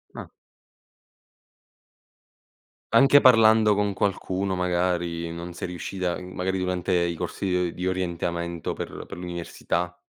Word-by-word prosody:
Ah. - - -8 2.6
Anche 140 +1 +7
parlando 110 -4 +6
con 105 0 +1
qualcuno, 95 -1 -1
magari, 85 -2 -1
non 85 +1 -7
sei 85 - -5
riuscita 90 0 -3
i - - -9
magari 90 +1 -3
durante 90 0 -1
i 85 -1 +1
corsi, 100 - -4
di 90 -1 +1
o - - -5
di 90 +1 -3
orientamento 85 -2 -2
per - - -6
per - - -9
l'università? 90 0 -4
90 Hz, 125 wpm, -25 LUFS, 85-95 Hz, 2.6 s, Anche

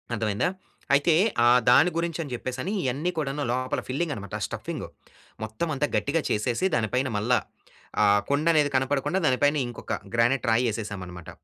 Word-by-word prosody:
అర్థమయిందా? 110 - 0 0.4
అయితే 145 +4 +4 0.3
ఆ - - +7 0.2
దాని 140 +8 +6
గురించని 165 -3 -2
జెప్పేసని 130 +8 -4
ఇయన్నీ 140 +7 -1
కూడాను 145 -1 -2
లోపల 130 +1 -1
ఫిల్లింగ్ 145 +4 -1
అనమాట. 100 0 -7
స్టఫింగు - - -5 0.6
మొత్తం 110 +9 -3
అంతా 145 +2 0
గట్టిగా 150 +2 0
చేసేసి 115 - 0
దానిపైన 125 +4 0
మల్లా 120 +4 +2 0.7
ఆ - - +5 0.2
కుండనేది 150 0 +3
కనపడకుండా 140 +7 0
దాని 130 - +3
పైన 145 +1 +4
ఇంకొక 120 -1 -6 0.2
గ్రానైట్ 120 +1 +2
రాయేసేసాం 110 -3 0
అనమాట. 90 -2 -10
130 Hz, 140 wpm, -26 LUFS, 115-150 Hz, 0.7 s, ఆ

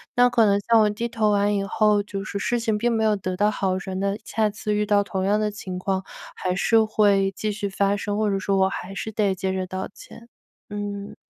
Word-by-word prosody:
那 245 0 +6
可 240 -2 +3
能 200 0 +3
像 230 +1 +4
我 210 - +4
低 225 +3 -3
头 225 -3 0
完 205 0 +2
以 195 - 0
后， 210 +1 +2
就 200 -1 -5
是 200 +1 -4
事 240 +3 0
情 220 -2 0
并 240 +1 +1
没 225 -1 +1
有 215 -1 +3
得 185 -2 -4
到 210 +2 +3
好 190 -2 -1
转 190 0 -5
的， 200 +1 -1
下 215 -1 0
次 210 0 -3
遇 210 0 0
到 205 -1 +3
同 190 -1 -3
样 210 +2 +2
的 210 -1 0
情 185 -3 -6
况 190 0 -1 0.3
还 180 0 -2
是 225 +3 +3
会 200 -3 +2
继 215 +2 -2
续 205 0 -3
发 200 +1 +1
生， 205 0 -3
或 215 -1 +1
者 195 -1 0
说 200 -1 0
我 190 - +4
还 195 - -6
是 220 - -4
得 205 -2 +1
接 190 0 -2
着 185 -1 -2
道 185 +1 -4
歉。 230 - -14 0.4
嗯。 205 -1 -5
205 Hz, 265 characters per minute, -24 LUFS, 195-215 Hz, 0.4 s, 那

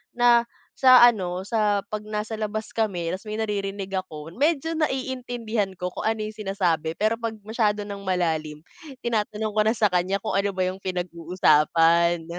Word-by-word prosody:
Na 240 -1 +5 0.4
sa 255 -2 +8
ano 185 -5 +1
sa 210 -3 +1
pag 215 0 -3
nasa 215 +1 -4
labas 215 0 -4
kami 180 -7 -1
tas 190 +4 -6
may 215 - -4
naririnig 200 -2 -3
ako 160 -3 -9
medyo 310 +3 +1
naiintindihan 245 -8 -2
ko 180 0 -4
kung - - -3
ano 220 -1 0
yung 215 - -6
sinasabi. 175 -6 -1
Pero 215 +2 +2
pag 225 -1 -3
masyado 210 -2 0
ng 200 -1 -7
malalim 160 -5 -1 0.4
tinatanong 215 -2 -1
ko 215 - +4
na 220 +2 +2
sa 210 - +4
kanya 180 +2 +1
kung 215 - -2
ano 200 +1 +1
ba 185 -1 +1
yung 190 +1 -5
pinag-uusapan. 170 -1 +2
205 Hz, 165 wpm, -24 LUFS, 180-220 Hz, 0.4 s, sa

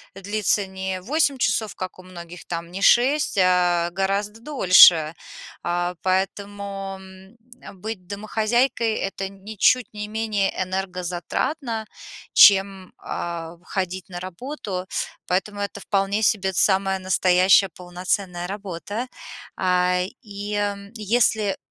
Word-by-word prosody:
длится 205 0 0
не 190 0 -4
8 285 - +1
часов, 220 -2 0
как 185 0 -6
у - - -12
многих, 175 -1 -11
там 170 0 -5
не 195 +2 -6
6, 265 0 +4
а 180 -2 +3
гораздо 200 +4 -2
дольше. 180 - +6 0.5
А, 175 +1 -1
поэтому, 195 +1 -2
м, 190 +3 -15 0.5
быть 215 -4 -6
домохозяйкой- 220 +4 0
это 195 -1 -3
ничуть 210 +5 +1
не 210 0 -5
менее 215 -2 -1
энергозатратно, 190 - -3 0.5
чем, 195 -2 +5
а, 170 -1 -5
в 175 - -29
ходить 185 -1 -4
на 175 -1 -6
работу. 185 - -6 0.4
Поэтому, 205 +3 -1
это 200 0 -4
вполне 200 +1 0
себе 195 -3 +1
самая 190 +1 +2
настоящая 185 +1 +4
полноценная 180 0 -3
работа. 205 +4 -5 0.5
А, 180 0 +2 0.2
и 205 -1 -4 0.3
если 215 -1 +1
195 Hz, 110 wpm, -23 LUFS, 180-210 Hz, 0.5 s, дольше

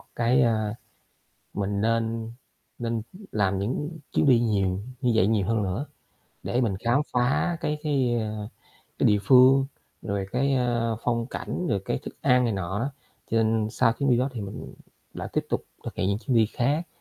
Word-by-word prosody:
cái, 120 +3 +3
a 110 -2 +1 0.8
mình 100 0 -1
nên 115 0 0 0.5
nên 115 -2 -2 0.3
làm 100 -2 +1
những 145 - -3
chuyến - - +2
đi 125 -4 +6
nhiều 100 -4 +1 0.2
như 125 -3 +2
vậy 100 -3 +4
nhiều 105 -4 +1
hơn 110 -1 +1
nữa, 100 +10 -2 0.6
để 125 - 0
mình 110 -6 +1
khám 120 +5 +3
phá 130 +8 +1
cái 150 0 -1
cái, 135 -5 +1
ơ, 105 -1 -4 0.5
cái - - +3
địa 105 -1 +4
phương, 130 +3 +6 0.4
rồi 100 -1 -2
cái, 135 +2 +2
ơ, 120 -3 0
phong 115 -1 0
cảnh, 180 +6 -4
rồi 100 - 0
cái - - -1
thức - - -9
ăn 125 0 +4
này 115 - +1
nọ 95 +1 -2
đó. 135 +3 -2 0.4
Cho 115 - +1
nên 110 -1 +1
sau 115 0 +3
chuyến 140 +1 0
đi 120 - +5
đó 130 +3 +1
thì 115 - -5
mình 100 0 -7 0.4
đã - - -5
tiếp - - 0
tục - - -1 0.2
thực - - -6
hiện 95 - 0
những 100 +1 0
chuyến 125 0 0
đi 110 -1 +5
khác 145 +10 0
115 Hz, 190 wpm, -26 LUFS, 105-125 Hz, 0.8 s, đi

